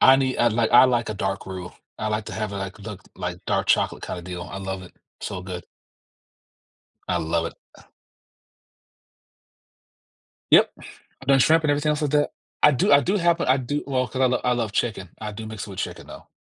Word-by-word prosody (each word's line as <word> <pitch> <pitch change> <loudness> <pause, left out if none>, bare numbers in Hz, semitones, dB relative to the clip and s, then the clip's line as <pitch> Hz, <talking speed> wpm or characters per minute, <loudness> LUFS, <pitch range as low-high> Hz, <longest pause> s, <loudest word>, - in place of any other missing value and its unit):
I 130 - +8
need 130 -1 0
I'd 120 -1 +4
like 115 0 +1
I 120 - +9
like 120 -3 +1
a 110 - -3
dark 95 -1 -3
roux. 95 -2 -6 0.3
I 110 - -1
like 105 0 -1
to - - -6
have 110 -2 -3
it 100 - -4
like 95 +1 -5
look 100 -2 -8
like 90 -1 -4
dark - - 0
chocolate - - +2
kinda 90 - -5
deal. 90 0 -6
I 90 +3 -7
love 95 -1 -4
it. 90 - -13 0.3
So 90 - -4
good. 90 -2 -6 1.5
I - - +2
love 85 +1 0
it. - - -10 3.0
Yep. - - +7 0.3
I've 135 - -17
done 135 - +6
shrimp 160 +4 +4
and 150 - +3
everything 145 +1 +1
else 150 0 -1
like 150 - 0
that. 145 0 +3 0.3
I 150 - +7
do 135 +2 +2
I 140 - +8
do 190 +8 0
have 170 -2 +2
I 130 -4 +3
do 140 +3 -2
well, 130 -2 0
'cause 130 +4 -5
I - - +5
l 125 -1 +2
I 125 - +3
love 115 -4 -1
chicken. 105 -5 -1
I 105 -1 -4
do 110 +1 -7
mix 110 -1 -6
it 100 - -10
with 95 - -9
chicken - - -4
though, - - -11
110 Hz, 215 wpm, -24 LUFS, 95-135 Hz, 3.0 s, I